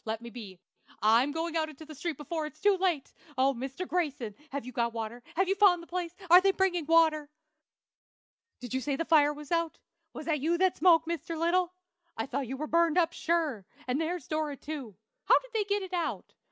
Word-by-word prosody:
Let 220 0 -3
me 235 - -8
be! 210 -6 -9 0.5
I'm 230 +6 +4
going 325 +2 -3
out 315 -1 0
in 310 - -11
the 315 0 -10
street 315 0 -4
before 305 +1 -3
it's 305 0 -14
too 410 +2 +4
late! 345 -8 0 0.2
Oh, 270 +1 +3
Mr. 265 +8 -5
Grayson! 285 - -2 0.2
have 280 -2 -5
you 255 - -7
got 235 -1 -1
water? 225 +2 -5
have 380 +3 +2
you 390 - +3
found 385 -4 +4
the - - -11
place? 350 0 -3 0.2
are 355 +2 +8
they 390 - +3
bringing 360 -5 0
water? 320 -3 +4 1.3
"Did 245 0 -7
you 260 - 0
say 275 +2 -1
the 330 - -2
fire 300 -2 +5
was 295 0 -10
out? 335 -1 0 0.3
Was - - -8
that 310 -3 0
you 330 +5 +1
that 375 0 +2
spoke, 330 -1 +5
Mr. 335 0 -4
Little? 345 +2 +1 0.5
I 225 - -1
thought 270 0 -3
you 265 +3 -5
were 305 - -3
burned 335 +1 +2
up, 335 -1 +3
sure; 315 - -1 0.2
and 255 +5 0
there's 330 -2 -3
Dora, 310 -2 -2
too. 275 -9 -7 0.3
How - - +6
did - - -7
they 430 -2 +1
get 405 0 0
it 375 -1 -8
out? 345 -2 -3
315 Hz, 220 wpm, -29 LUFS, 270-345 Hz, 1.3 s, are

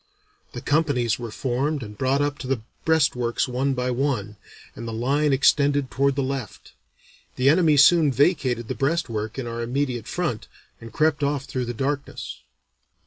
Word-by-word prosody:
The - - -6
companies 145 -8 +1
were 120 -1 -5
formed 135 +5 -2
and 105 -1 -9
brought 135 +5 +1
up 145 0 -2
to 130 - -6
the 130 -4 -1 0.2
breastworks 135 -8 +1
one 130 +2 -1
by 125 0 -1
one, 120 -6 -1 0.4
and 115 - -7
the - - -4
line 140 +6 +1
extended 140 0 +3
toward 140 0 +1
the 140 - 0
left. 135 -1 -5 0.6
The 130 +2 +3
enemy 155 -1 +4
soon 150 +1 +6
vacated 130 -4 +1
the - - -2
breastwork 120 -8 -2
in 130 - -3
our 115 0 -4
immediate 125 -1 -2
front, 155 -12 -3 0.3
and 115 0 -10
crept 150 +3 +1
off 140 -1 0
through 130 -3 -3
the 120 0 -5
darkness." 140 +3 -4
135 Hz, 165 wpm, -24 LUFS, 120-145 Hz, 0.6 s, soon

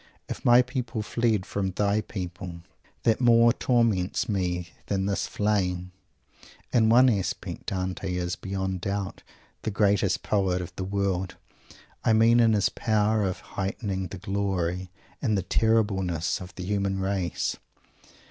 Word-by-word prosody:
"If - - -6
my 120 +1 +7
people 125 -3 -3
fled 110 -3 0
from 100 -1 -2
thy 100 +3 +1
people 90 -3 -7 0.4
that 115 +1 +2
more 120 -1 +6
torments 115 -7 +1
me 90 -4 -1 0.2
than 95 -1 0
this 100 0 -1
flame." 90 -4 0 0.8
In 110 -2 +4
one 125 +3 +7
respect 105 -7 -1
Dante 95 0 -2
is, 90 -1 -2
beyond 95 -1 -3
doubt, 100 0 -3 0.4
the - - -2
greatest 100 -1 +2
poet 95 -3 +1
of 90 - -7
the 95 - -3
world. 95 -1 -1 0.7
I 115 - +4
mean 115 +2 +5
in 115 -2 +5
his 100 -2 +3
power 110 0 +1
of 95 -2 -2
heightening 95 -1 -2
the 95 - -8
glory 95 -2 -2 0.3
and 110 -6 +1
the 95 - -1
terribleness 95 -7 +1
of 90 - -10
the 90 - -6
human 100 0 -1
race. 95 -3 -1
100 Hz, 140 wpm, -27 LUFS, 95-110 Hz, 0.8 s, my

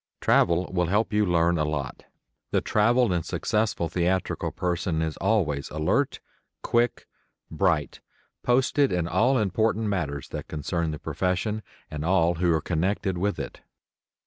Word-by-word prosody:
Travel 85 +1 +3
will 90 -2 +1
help 105 +4 +1
you 105 -1 +2
learn 85 -1 +2
a - - +2
lot. 75 -4 -4 0.4
The - - +2
traveled 115 0 +2
and 85 -2 0
successful 105 -3 -1
theatrical 90 +2 -1
person 90 -2 -1
is 80 -1 -1
always 85 -10 0
alert, 80 +1 0 0.4
quick, 120 0 +1 0.5
bright, 80 -3 0 0.4
posted 130 +3 +2
in 90 -2 0
all 125 +8 +3
important 110 +1 +1
matters 75 -9 -2
that - - -6
concern 80 +2 -2
the 75 - -4
profession 90 +8 -2 0.3
and 75 -1 -4
all 85 -1 +3
who 90 -1 +3
are 80 -1 +2
connected 95 +4 -1
with 100 +2 0
it. - - -7
90 Hz, 145 wpm, -26 LUFS, 80-105 Hz, 0.5 s, Travel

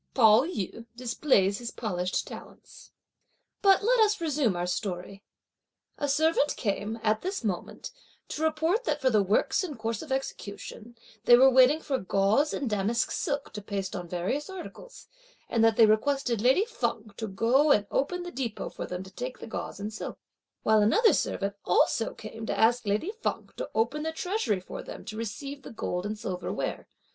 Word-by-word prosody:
Pao 225 0 +6
yü 230 - -5
displays 235 -5 +1
his 240 -1 -5
polished 185 -6 -2
talents. - - -12 0.7
But 390 -1 +5
let - - +3
us 425 -1 +4
resume 295 - +1
our 175 0 -1
story. 180 +1 -4 0.8
A 290 - -1
servant 300 0 +2
came, 210 0 -2
at 215 0 +2
this 380 -5 -3
moment, 190 -5 -4 0.4
to 300 - -5
report 320 +8 +1
that - - 0
for 260 -2 +2
the 215 -2 +4
works 200 - +2
in 320 -6 -5
course 225 -1 -3
of 305 - -9
execution, 235 -3 -5 0.3
they 240 - +8
were 265 +1 +7
waiting 260 +5 +5
for 270 -2 -1
gauze 200 +9 +2
and 280 - -2
damask 215 +2 0
silk 285 -5 -2
to 210 - -6
paste 200 -2 -4
on 180 -2 -5
various 185 - -2
articles, 380 +6 -10 0.4
and 230 -1 +1
that 225 -1 +5
they 225 - +8
requested 235 +1 +1
lady 265 - +4
Feng 230 - -3
to 220 - -3
go 235 +9 +3
and 210 -6 +4
open 355 +6 0
the 350 - -6
depôt 245 -7 -4
for - - -5
them 180 +1 -5
to 190 - -13
take 250 +5 -5
the - - -9
gauze 220 -2 -6
and 210 +2 -5
silk, 220 - -6 0.5
while 220 -1 +4
another 440 - +5
servant 200 0 -1
also 225 +5 +2
came 220 +1 -8
to - - -2
ask 235 0 +3
lady 215 - 0
Feng - - -2
to - - -5
open 235 +7 +1
the 320 +1 -2
treasury 320 - -1
for - - -7
them - - -9
to 215 - -6
receive 275 +6 -5
the - - -10
gold 185 -5 -3
and 215 +1 -4
silver 190 -5 -4
ware. - - -3
230 Hz, 185 wpm, -28 LUFS, 205-290 Hz, 0.8 s, they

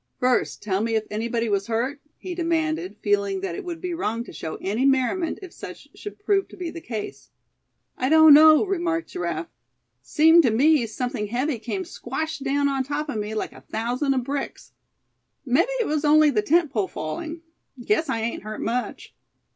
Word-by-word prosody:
"First 250 0 +1
tell 195 -1 0
me 225 0 0
if 220 -1 0
anybody 230 +2 -1
was 200 -1 0
hurt?" 250 +6 -2 0.2
he 370 - -6
demanded, 330 0 -1
feeling 200 -2 +1
that 190 -3 -3
it - - -6
would 345 -2 -6
be 360 0 -4
wrong 230 -8 -2
to - - -12
show 160 - -5
any 210 +6 -1
merriment 275 +6 +1
if 365 - -10
such - - -10
should 415 - -9
prove 405 -1 +1
to - - -14
be 350 -3 -4
the 335 0 -8
case. 220 -8 -6 0.7
"I 255 - +1
don't 315 -1 +8
know," 310 +3 +8
remarked 340 -4 -1
Giraffe; 170 -2 -4 0.5
"seemed 320 - +5
to 255 - +3
me 265 +2 +3
something 245 -1 -3
heavy 250 +4 -1
came 305 - -4
squash 320 -2 -4
down 280 +1 +1
on 270 -1 0
top 295 +3 -3
of 240 - -3
me 210 +1 -4
like 215 - -3
a - - -14
thousand 250 +5 -1
of 255 - 0
bricks. 275 +2 -5 0.7
Mebbe 285 - +2
it 470 - +1
was 305 -3 -1
only 305 0 +5
the 215 -5 +1
tent 315 +5 +2
pole 210 -7 0
falling. 315 - -6 0.4
Guess 330 -6 +1
I 225 - -1
ain't 230 +1 -3
hurt 215 +1 -7
much." 240 +2 -3
275 Hz, 190 wpm, -24 LUFS, 225-320 Hz, 0.7 s, don't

